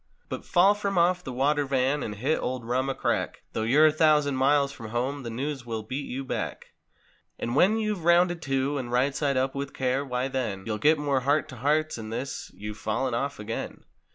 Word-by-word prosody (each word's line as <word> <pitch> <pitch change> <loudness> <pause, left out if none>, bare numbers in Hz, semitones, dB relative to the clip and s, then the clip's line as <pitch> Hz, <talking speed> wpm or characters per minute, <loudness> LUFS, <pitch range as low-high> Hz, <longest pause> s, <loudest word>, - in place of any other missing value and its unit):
But! - - -5
fall 190 +3 +5
from 200 -2 -2
off 180 +1 +3
the 130 - -5
"water 145 +4 +1
van" 135 +1 +1
and 105 - -4
hit 135 +10 0
old 125 -2 -3
"rum" 130 +3 0
a 135 - -1
crack - - -1
Though - - -1
you're 135 +8 +5
a 155 - +6
thousand 150 -2 +3
miles 140 +1 +3
from 115 -6 -9
home 130 +5 -2
the 120 - -6
news 135 +3 -3
will 115 -2 -4
beat 130 +6 -4
you 135 +2 -4
bacL - - -2
55 - - -24 0.8
And 120 - -3
when 195 +9 +4
you've 215 -5 -2
"rounded 175 0 +4
to" 135 0 0
and 120 -2 -5
"right 130 +3 +2
side 140 -3 0
up 130 +1 +1
with 140 0 -5
care" 130 +1 0
why 125 -1 -2
then 120 -8 -3
You'll 110 -1 -2
get 155 +7 +4
more 145 -2 +1
"heart 140 +3 +1
to 130 - -9
hearts," 150 +2 +1
and 110 0 -7
this: 125 +4 -4
"You've 105 +1 -7
fallen 125 +4 -1
off 140 +4 -2
again." 105 +2 -5
135 Hz, 220 wpm, -27 LUFS, 125-150 Hz, 0.8 s, a